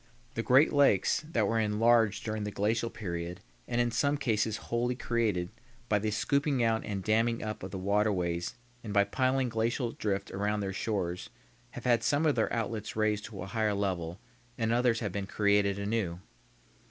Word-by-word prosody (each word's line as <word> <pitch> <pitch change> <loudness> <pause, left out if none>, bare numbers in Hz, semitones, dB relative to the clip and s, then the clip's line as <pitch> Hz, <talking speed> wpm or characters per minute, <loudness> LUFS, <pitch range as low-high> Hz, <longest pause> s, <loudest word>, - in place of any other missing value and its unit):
The - - -1
great 135 +5 +5
lakes, 140 -5 +3
that 110 -8 +2
were 115 +1 +1
enlarged 110 0 +3
during 110 -1 -2
the 105 - -2
glacial 110 +3 0
period 85 -5 -5 0.3
and 120 - -1
in 120 0 +2
some 140 +6 +1
cases 110 -5 0
wholly 120 +1 +1
created 110 -8 0 0.4
by 105 - +3
the 110 +1 -1
scooping 140 +4 +1
out 115 -1 +1
and 100 -3 -4
damming 115 +3 +1
up 110 0 -4
of 95 - -6
the 95 - -5
waterways 95 -1 0 0.3
and 105 -3 -5
by 100 0 +5
piling 130 +5 +1
glacial 115 +1 -1
drift 100 -3 -2
around 105 +2 -1
their 95 -1 -3
shores 95 -4 -2 0.5
have - - -7
had 120 -2 +4
some 145 +6 +1
of 150 - +4
their 115 -4 0
outlets 110 -2 -3
raised 105 -1 0
to 100 -5 -7
a - - -5
higher 105 +1 0
level, 90 -3 -2 0.4
and 115 0 +1
others 120 -1 +2
have 105 -4 -2
been 100 0 -4
created 100 -1 +2
anew. 100 -4 -2
110 Hz, 180 wpm, -30 LUFS, 100-115 Hz, 0.5 s, great